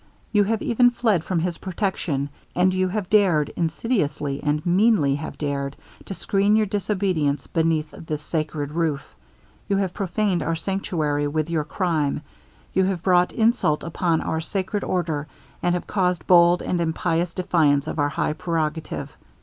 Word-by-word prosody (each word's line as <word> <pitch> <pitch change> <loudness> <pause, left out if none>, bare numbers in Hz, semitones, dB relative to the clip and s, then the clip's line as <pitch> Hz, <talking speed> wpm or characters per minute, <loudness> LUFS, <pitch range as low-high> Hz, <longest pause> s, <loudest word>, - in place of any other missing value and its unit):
You 205 -2 +4
have 220 +1 -1
even 245 +1 +4
fled 220 -8 +1
from 175 -3 -1
his 175 -1 -2
protection 175 -7 -2 0.3
and 185 +1 +3
you 185 0 +1
have 195 0 -3
dared 180 -9 +4
insidiously, 160 - -1
and 150 +2 -1
meanly 180 -5 +3
have 145 +3 -5
dared, 140 -2 -2 0.3
to 195 - -6
screen 200 +3 +2
your 215 0 +3
disobedience 190 -8 0
beneath 160 -2 0
this 155 -2 -6
sacred 155 -3 -3
roof. 155 -3 -2 0.6
You 200 - +2
have 190 -2 -1
prophaned 195 -1 0
our 165 - -1
sanctuary 160 -5 -1
with 155 +2 -2
your 155 -3 0
crime. 155 -4 -1 0.5
You 190 - +3
have 185 -3 -2
brought 180 -1 +4
insult 225 -9 +2
upon 165 0 0
our 160 0 -2
sacred 195 +4 -3
order, 160 -5 -1 0.3
and 175 0 +1
have 180 - -3
caused 180 -3 0
bold 175 0 +5
and 175 -1 -1
impious 165 +1 0
defiance 155 -6 +2
of - - -4
our 145 0 +2
high 145 - -1
prerogative. 160 -1 -3
170 Hz, 160 wpm, -23 LUFS, 155-190 Hz, 0.6 s, bold